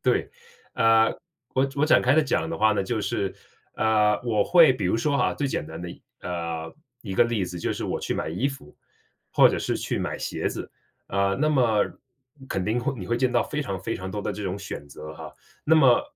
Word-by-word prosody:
对， - - +1 0.4
啊， 115 0 +4 0.4
我 130 +1 +2
我 145 - +3
展 155 - +5
开 130 +3 +3
地 160 - +5
讲 160 +2 0
的 165 - -3
话 110 0 +4
呢， 100 - 0
就 110 +2 -2
是 95 -1 -2 0.4
呃， 105 -1 +3
我 110 -4 +2
会 165 - +6
比 100 -7 -2
如 95 - +2
说 140 +4 +1
哈， - - +1
最 145 - -1
简 105 - -2
单 80 +2 -8
的 90 - -6 0.3
呃， 85 -2 -4 0.3
一 95 -4 -5
个 105 - +5
例 115 -5 0
子 90 0 -6
就 85 - -2
是 - - -4
我 - - -2
去 - - -2
买 - - -2
衣 105 - 0
服 135 - -11 0.5
或 - - +6
者 - - -1
是 - - -1
去 - - -2
买 - - -3
鞋 - - -2
子， - - -6 0.4
啊， 100 0 +1
那 155 - +3
么 120 -8 +3 0.6
肯 95 - -2
定 110 +4 0
会 135 +3 -1
你 90 - -6
会 120 - 0
见 125 0 +1
到 120 -1 +2
非 150 0 -3
常 95 -7 -4
非 115 +5 -3
常 95 +1 -6
多 105 - -4
的 - - -3
这 105 - -6
种 95 +1 -3
选 70 -7 -7
择 75 +2 -9
哈。 - - -9 0.3
那 160 - +4
么， 130 -6 +5
110 Hz, 245 characters per minute, -25 LUFS, 95-130 Hz, 0.6 s, 会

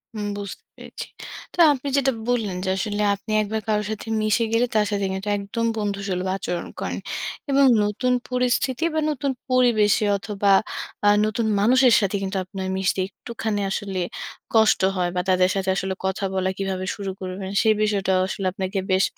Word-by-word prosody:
হুম, 210 -1 -3
বুঝতে 200 -1 -7
পেরেছি। - - -8 0.5
তো - - -13 0.2
আপনি 280 +1 -6
যেটা 270 -1 +3 0.2
বললেন 225 -6 0
যে, - - 0
আসলে 210 0 -2
আপনি 210 +2 -9
একবার 215 +1 -2
কারো 210 -1 +2
সাথে 220 +1 -6
মিশে 215 +2 +2
গেলে, 230 +2 +3
তার 215 -1 +4
সাথে 200 -1 0
কিন্তু 190 +2 -5
একদম 205 +4 -3
বন্ধুসুলভ 200 -3 -2
আচরণ 180 -2 -4
করেন। - - -3 0.5
এবং 275 0 +5 0.2
নতুন 210 +5 0 0.2
পরিস্থিতি 250 +2 0
বা 315 - +1
নতুন 280 -1 -1 0.2
পরিবেশে 235 -4 +3
অথবা 200 0 0 0.5
আ - - +6 0.2
নতুন 215 +2 -1
মানুষের 250 +3 +5
সাথে 200 0 0
কিন্তু 195 0 -2
আপনার 190 0 -5
মিশতে, 190 0 0
একটুখানি 220 0 -4
আসলে 195 -1 -3 0.5
কষ্ট 220 -3 +4
হয় 180 -1 0
বা 180 - +1
তাদের 185 0 +4
সাথে 190 -1 -1
আসলে 190 0 -1
কথা 190 +1 -1
বলা 190 0 0
কিভাবে 190 -1 -2
শুরু 200 -3 -4
করবেন? 190 +1 -5
সেই 220 -1 +4
বিষয়টাও 195 -3 +2
আসলে 195 0 -4
আপনাকে 190 +1 -2
বেশ, 190 +1 +4
205 Hz, 170 wpm, -23 LUFS, 190-225 Hz, 0.5 s, আ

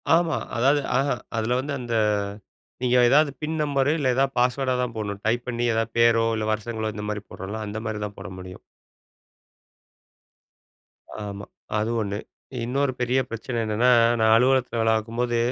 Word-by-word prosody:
ஆமா. 170 -1 +1 0.2
அதாவது 140 +4 +3
அஹ 135 +2 +2 0.3
அதுல 115 +2 0
வந்து 140 +2 -3
அந்த, 120 -2 -4 0.9
நீங்க 125 0 +3
ஏதாவது 150 +2 +5
பின் 155 +1 -2
நம்பரு 140 -1 +1
இல்ல 130 -4 +2
ஏதாவது 135 0 +1
பாஸ்வேர்டா 130 +1 +1
தான் 120 -2 -3
போடணும். 100 -2 -4
டைப் 120 +2 0
பண்ணி 120 0 -1
எதாவது 115 0 -1
பேரோ 115 -1 +5
இல்ல 110 -1 -2
வருஷங்களோ 110 0 -3
இந்த 105 - -5
மாரி 105 -1 -4
போடுறோம்ல, 105 +4 -6
அந்த 105 +2 -5
மாதிரி 110 -1 -3
தான் 105 - -10
போட 100 - -7
முடியும். 90 0 -9 2.7
ஆமா. 100 -1 -6 0.3
அது 105 +1 0
ஒண்ணு. 100 -1 -3 0.5
இன்னொரு 135 +3 0
பெரிய 125 +2 +2
பிரச்சனை 115 +2 -4
என்னன்னா, 110 +4 +2 0.3
நான் 110 0 +5
அலுவலகத்ல 125 0 +2
வேலை 115 0 +3
பார்க்கும்போது, 120 +2 -1
120 Hz, 155 wpm, -24 LUFS, 110-130 Hz, 2.7 s, ஏதாவது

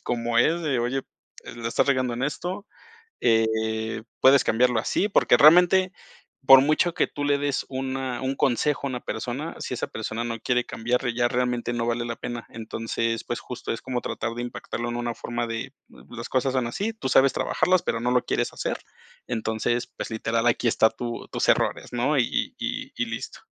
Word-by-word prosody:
como 120 -1 0
es 165 +8 +3
de: 135 -6 0
"Oye, 130 +3 -1 0.5
la 115 0 -3
estás - - +1
regando 130 -3 +1
en 125 +3 -2
esto, 180 - -4 0.5
eh, 110 -1 +1 0.2
puedes 135 +1 +6
cambiarlo 120 +1 +3
así". 195 - 0
Porque 200 - +4
realmente, 180 +4 +6 0.6
por 135 -1 +10
mucho 155 +4 +2
que - - +1
tú 145 - -4
le 145 0 +2
des 140 -1 -1
una 130 -1 -3
un 135 +1 -1
consejo 140 +3 +1
a - - -2
una 125 -1 -4
persona, 125 +9 -4
si - - -4
esa - - -3
persona 110 +1 -4
no 115 -1 -3
quiere 125 +1 +1
cambiar, 120 +1 -1
ya 120 +1 +1
realmente 125 -1 -1
no 120 -1 -1
vale 120 0 -1
la 115 -1 -4
pena. 120 -1 -6
Entonces, 115 0 -3
pues 120 0 -4
justo 125 - -5
es 115 - -6
como 125 -1 -2
tratar 115 0 -4
de 120 - -4
impactarlo 120 0 -5
en 120 - -3
una 120 -1 -2
forma 120 +1 -4
de: 115 +4 -4 0.2
"Las 120 0 -10
cosas 130 0 +1
son 125 -3 0
así, 205 - -2
tú 215 -11 -5
sabes 135 +1 +5
trabajarlas, 185 -1 +1
pero 115 - -1
no 125 +1 0
lo 125 - +2
quieres - - -1
hacer". - - -3 0.5
Entonces, 110 +1 -1
pues - - -7
literal, 115 +1 -1
aquí 120 0 +2
está 110 - +4
tu 120 +1 -6
tus - - -1
errores, - - +1
¿no?, 125 +5 +1
y 125 - 0
y - - -4
y - - -1
listo. - - -7
120 Hz, 195 wpm, -25 LUFS, 115-135 Hz, 0.6 s, por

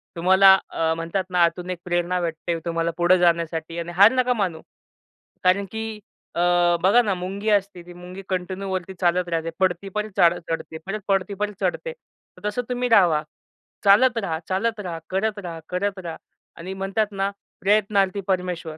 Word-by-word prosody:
तुम्हाला 190 +3 +6
अ, 160 0 0
म्हणतात 165 +4 -2
ना, 180 -1 +3
आतून 175 +2 0
एक 180 -2 -4
प्रेरणा 175 0 0
भेटते 165 0 -3
तुम्हाला 165 0 -1
पुढं 175 +1 +4
जाण्यासाठी 170 -1 0
आणि 170 0 -5
हार 205 +3 +9
नका 250 -1 +2
मानू, 185 -8 -2 0.8
कारण 185 +2 +3
की 220 0 -4 0.5
अ, - - -2 0.4
बघा 200 +7 +5
ना, 210 -5 0
मुंगी 190 +4 -4
असते, 200 -3 +1
ती 175 - -11
मुंगी 180 +2 -10
कंटिन्यू 185 +1 -3
वरती 190 0 -3
चालत 175 0 +1
राहते. 165 -1 -1
पडती, 185 +1 0
परत 210 +2 -3
चढ 175 0 +5
चढते, 165 -1 -4
परत 210 +2 -4
पडती, 195 +1 0
पर 210 +1 -2
चढते. 190 - -1
तर 210 - -12
तसं 210 +4 -2
तुम्ही 250 0 -1
राहावा, 175 -9 +4 0.6
चालत 235 +5 +5
राहा, 165 -7 -3
चालत 220 +4 -1
राहा, 175 -5 -5
करत 205 +3 -1
राहा, 170 -4 -7
करत 195 +2 -2
रहा 170 -3 -6 0.4
आणि 185 +3 -6
म्हणतात 195 +3 -1
ना, 195 0 -1 0.3
प्रयत्नार्थी 200 -1 +2
परमेश्वर. 180 -4 -2
185 Hz, 170 wpm, -23 LUFS, 175-200 Hz, 0.8 s, हार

